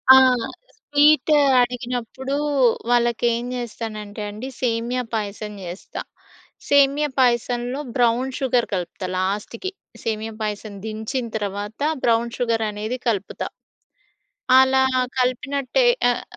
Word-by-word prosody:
ఆ! - - +9 0.6
స్వీట్ 295 +2 +3 0.3
అడిగినప్పుడు 245 +2 -3 0.5
వాళ్ళకి 240 -1 +2
ఏం 235 +1 -2
జేస్తానంటే 215 -3 -6
అండి 215 +5 -7
సేమియా 240 +1 0
పాయసం 210 -1 -3
జేస్తా. 175 +2 -7 0.7
సేమియా 285 +1 +4
పాయసంలో 245 +1 +1 0.2
బ్రౌన్ 245 +1 +2
షుగర్ 250 -3 +1
కలుపుతా 180 +1 -3
లాస్ట్‌కి. 205 - -2 0.3
సేమియా 220 0 -3
పాయసం 210 0 -4
దించిన 220 +4 -3
తర్వాత 205 +1 -4 0.2
బ్రౌన్ 235 0 +2
షుగర్ 230 -2 0
అనేది 215 +4 -4
కలుపుతా. 200 -4 -1 1.1
అలా 265 0 +4 0.4
కలిపినట్టే 265 - +1 0.3
ఆహ్, 245 - -1
235 Hz, 100 wpm, -22 LUFS, 215-255 Hz, 1.1 s, ఆ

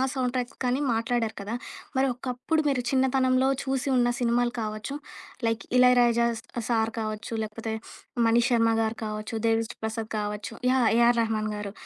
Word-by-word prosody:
Sound 255 -2 0
tracks 250 0 -3
కానీ 250 +2 +1
మాట్లాడారు 230 0 -1
కదా! 205 +3 -4 0.4
మరి 265 - +3
ఒకప్పుడు, 255 +6 -1
మీరు 265 -3 +1
చిన్నతనంలో 260 0 +3
చూసి 270 0 -1
ఉన్న 240 0 +3
సినిమాలు 240 0 +2
కావచ్చు. 215 +6 -4 0.5
లైక్ 225 0 -1 0.2
'ఇళయరాజా' 240 -2 +5
స-సార్ 225 -2 -1
కావచ్చు. 215 +1 -4
లేకపోతే 220 +1 -5 0.5
'మణి 230 +1 +4
శర్మ' 230 -2 +3
గారు 220 +1 -2
కావచ్చు, 215 +1 -4
'దేవిశ్రీ 225 0 0
ప్రసాద్' 220 0 -3
కావచ్చు. 210 +1 -4 0.2
యాహ్, 255 -3 +4
'ఏఆర్ 235 0 +5
రెహమాన్' 215 -1 -1
గారు. 205 -1 -5
235 Hz, 145 wpm, -27 LUFS, 220-250 Hz, 0.5 s, ఇళయరాజా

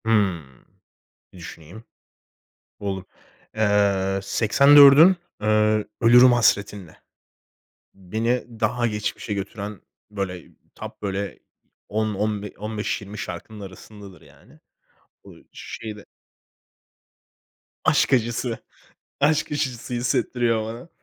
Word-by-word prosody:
Hımm, 95 - -1 0.7
bir - - -14
düşüneyim. 85 +4 -11 1.0
Buldum. 95 -2 -4 0.5
Iıı, 100 -2 +1
Seksendört'ün, 140 - +6 0.3
ııı, 110 0 +2 0.2
Ölürüm 120 +2 +7
Hasretinle. 100 -6 0 0.9
Beni 110 +6 -2 0.2
daha 120 +2 0
geçmişe 105 -1 -3
götüren, 100 0 -6 0.3
böyle, 95 -4 -5 0.3
top, - - -10
böyle, 100 0 -4 0.5
10 110 0 -1
on 105 +1 -2
be 105 - -8
on 105 +1 -6
beş, 105 - -2
20 105 +1 -10
şarkının 100 +4 -7
arasındadır 100 -1 -12
yani. - - -21 0.6
Bu - - -14 0.2
şeyde 105 -2 -9 1.8
Aşk - - +2
acısı. 120 -1 0 0.6
Aşk 150 +2 +1
acısı 130 -5 -3
hissettiriyor 120 -1 0
bana. 115 +8 -8
105 Hz, 95 wpm, -23 LUFS, 100-120 Hz, 1.8 s, Ölürüm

